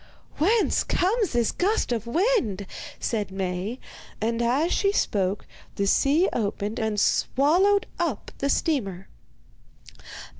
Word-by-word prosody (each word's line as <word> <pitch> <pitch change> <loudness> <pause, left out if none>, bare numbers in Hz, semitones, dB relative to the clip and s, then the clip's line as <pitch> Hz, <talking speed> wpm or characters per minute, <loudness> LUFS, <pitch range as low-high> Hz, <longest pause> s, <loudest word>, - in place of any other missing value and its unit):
'Whence 420 +8 +2
comes 400 - 0
this 240 -2 +2
gust 405 - 0
of 235 -1 -2
wind?' 255 - +1 0.3
said 215 -4 -2
Maie; 190 +5 -3 0.4
and 230 +2 -1
as 270 +9 +1
she 395 -1 +2
spoke 200 - 0 0.3
the 200 - 0
sea 290 - +3
opened 210 -1 -2
and 220 -2 -1
swallowed 360 - +3
up 320 -11 -2
the 280 - 0
steamer. 195 - -1
240 Hz, 115 wpm, -25 LUFS, -, 0.4 s, sea